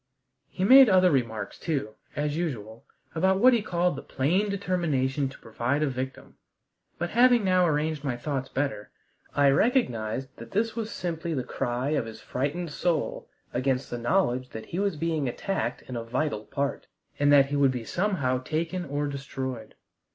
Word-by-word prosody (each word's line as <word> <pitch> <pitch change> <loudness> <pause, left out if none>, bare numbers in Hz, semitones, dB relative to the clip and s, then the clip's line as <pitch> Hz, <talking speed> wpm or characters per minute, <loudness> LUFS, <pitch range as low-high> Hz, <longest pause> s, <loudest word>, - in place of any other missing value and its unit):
He 185 - -3
made 260 +4 +9
other 185 -1 +5
remarks 110 -7 -2
too, 135 -10 -2 0.2
as 145 0 -1
usual, 115 -10 -4 0.3
about 190 +3 +2
what 250 +5 +6
he 235 - +3
called 180 -4 0
the 135 - -6
"plain 180 +10 0
determination 155 -9 0
to 135 - -12
provide 120 +6 -1
a - - +2
victim"; 130 0 -6 0.6
but, 175 - -3
having 245 -1 +5
now 185 -2 +4
arranged 150 -1 0
my 130 -4 -2
thoughts 135 0 -3
better, 130 -7 -2 0.5
I 140 -1 +5
recognized 135 - +1
that 115 0 -10
this 225 +2 0
was 225 -2 -3
simply 170 -4 -3
the 130 - -1
cry 125 +1 -2
of 145 -6 0
his 110 - -9
frightened 150 +6 -3
soul 170 +2 -1 0.2
against 130 +1 0
the 120 - -3
knowledge 125 -2 +1
that 110 - -8
he 175 - -4
was 200 -3 0
being 155 -3 -1
attacked 120 - -3
in 125 - -8
a 115 - -3
vital 120 -2 -2
part, 140 +5 -3 0.3
and 145 0 +4
that 140 -1 +6
he - - 0
would 140 -1 +4
be 125 -3 -4
somehow 165 - 0
taken 165 +5 -2
or 145 0 -2
destroyed. 130 -4 -5
145 Hz, 175 wpm, -27 LUFS, 130-175 Hz, 0.6 s, made